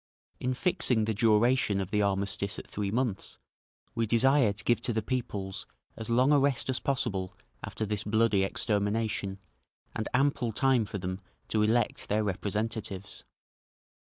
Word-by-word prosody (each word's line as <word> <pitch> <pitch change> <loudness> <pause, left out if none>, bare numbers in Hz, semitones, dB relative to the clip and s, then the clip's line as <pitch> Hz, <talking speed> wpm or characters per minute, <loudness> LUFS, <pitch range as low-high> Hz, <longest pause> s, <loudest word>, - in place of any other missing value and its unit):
In 125 0 -1
fixing 130 - +2
the 110 - 0
duration 110 0 +3
of 95 0 -4
the 105 - +2
armistice 100 0 0
at - - -7
three 100 -1 -3
months, 115 -2 -2 0.6
we 115 -1 0
desire 125 +1 +4
to 105 +1 -8
give 120 - +2
to 120 - -1
the 110 -1 -1
peoples 100 -6 -4 0.3
as 110 - -6
long 125 +4 +4
a 145 - +6
rest 135 -2 +1
as 130 - -1
possible 100 -9 -2 0.3
after 110 - -4
this 105 -1 -2
bloody 105 -2 +2
extermination, 105 -1 0 0.6
and 110 - -3
ample 130 -3 +1
time 130 -1 +3
for 100 - -5
them 95 0 -4 0.3
to 110 - +1
elect 110 +1 +1
their 105 +1 +1
representatives. 100 0 -3
110 Hz, 155 wpm, -29 LUFS, 100-120 Hz, 0.6 s, a